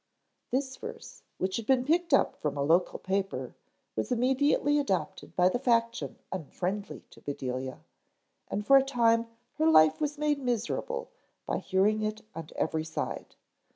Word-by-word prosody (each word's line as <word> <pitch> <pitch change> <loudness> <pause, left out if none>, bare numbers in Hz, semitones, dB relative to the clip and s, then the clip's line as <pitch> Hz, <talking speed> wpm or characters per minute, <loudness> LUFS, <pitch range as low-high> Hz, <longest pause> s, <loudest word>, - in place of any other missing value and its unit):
This 265 0 -1
verse, - - -9 0.2
which 190 0 -1
had 230 - -5
been 255 -1 +3
picked 335 +3 +2
up 275 - +4
from 150 -1 -3
a 140 - +1
local 170 +5 +3
paper, 195 +1 -2 0.4
was - - -2
immediately 265 +4 +3
adopted 190 -8 -2
by 180 0 +5
the 215 +7 +1
faction 235 -2 +1
unfriendly 190 +3 -4
to - - -16
Bedelia, 130 -2 -4 0.7
and 205 +1 -3
for 275 +5 +8
a 270 - +5
time 230 -3 +2 0.3
her 155 - +4
life 155 - +6
was 295 0 -1
made 295 -1 +1
miserable 265 - -2 0.3
by - - -1
hearing 205 +3 +2
it 215 0 -2
on 165 -1 -7
every 160 -1 0
side. 160 0 -5
215 Hz, 155 wpm, -29 LUFS, 180-270 Hz, 0.7 s, for